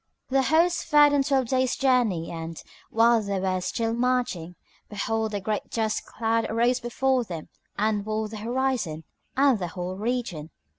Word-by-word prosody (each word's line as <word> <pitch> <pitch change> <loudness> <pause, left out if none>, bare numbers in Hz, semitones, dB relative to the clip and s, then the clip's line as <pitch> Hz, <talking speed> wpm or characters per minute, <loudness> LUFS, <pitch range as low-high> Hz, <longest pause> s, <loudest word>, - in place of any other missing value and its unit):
The 270 +1 +3
host 335 +5 +2
fared 295 -2 +6
on 285 - +4
twelve 270 -2 +1
days' 260 -1 +1
journey 240 -11 +1
and, 165 -1 -6 0.3
while 230 0 +4
they 200 -2 -2
were 185 -1 0
still 225 +5 -1
marching, 240 -9 -1 0.3
behold, 220 +1 -1
a - - -1
great 210 +2 -3
dust 220 -2 -1
cloud 225 0 0
arose 240 +3 +2
before 260 +1 +1
them 170 -7 -7 0.3
and 210 -1 +1
walled 215 0 -2
the 220 - -6
horizon 235 -8 -1 0.3
and 270 -5 +4
the 180 - -2
whole 180 +2 -5
region. 215 -9 -3
225 Hz, 160 wpm, -26 LUFS, 195-255 Hz, 0.3 s, fared